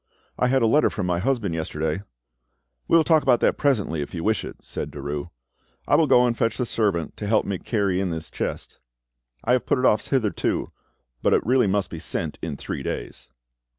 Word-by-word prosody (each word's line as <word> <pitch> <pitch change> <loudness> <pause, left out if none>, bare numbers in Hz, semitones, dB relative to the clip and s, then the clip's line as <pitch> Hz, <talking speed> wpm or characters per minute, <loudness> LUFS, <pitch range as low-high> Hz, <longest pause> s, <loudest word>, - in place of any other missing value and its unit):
I 125 - +1
had 130 -1 +2
a - - +5
letter 145 +7 +4
from 105 - -3
my 90 -1 0
husband 110 -4 0
yesterday——" 80 +1 -2 0.9
"We 165 - +5
will 165 - +5
talk 160 -1 +4
about 130 -4 +3
that - - +2
presently, 105 - +1
if 70 - -6
you 85 - -4
wish 110 0 +1
it," - - -7
said - - -6
Derues. 75 +3 -5 0.6
"I - - +4
will 160 - +4
go 125 -2 +5
and 120 -1 +1
fetch 115 0 0
the 125 - 0
servant 100 -8 -1
to 105 - -4
help 110 +1 +2
me 100 -3 -2
to - - -23
carry 100 -5 0
in 95 - -1
this 80 -1 -5
chest. - - -5 0.6
I 120 - 0
have 125 0 +2
put - - +2
it 130 - +1
off 110 - +3
hitherto, 120 -7 0 0.5
but - - +3
it - - 0
really 125 -1 +3
must 100 0 0
be 80 - -6
sent 80 -1 -3
in 75 -4 -4
three - - -5
days." - - -5
105 Hz, 220 wpm, -24 LUFS, 85-125 Hz, 0.9 s, a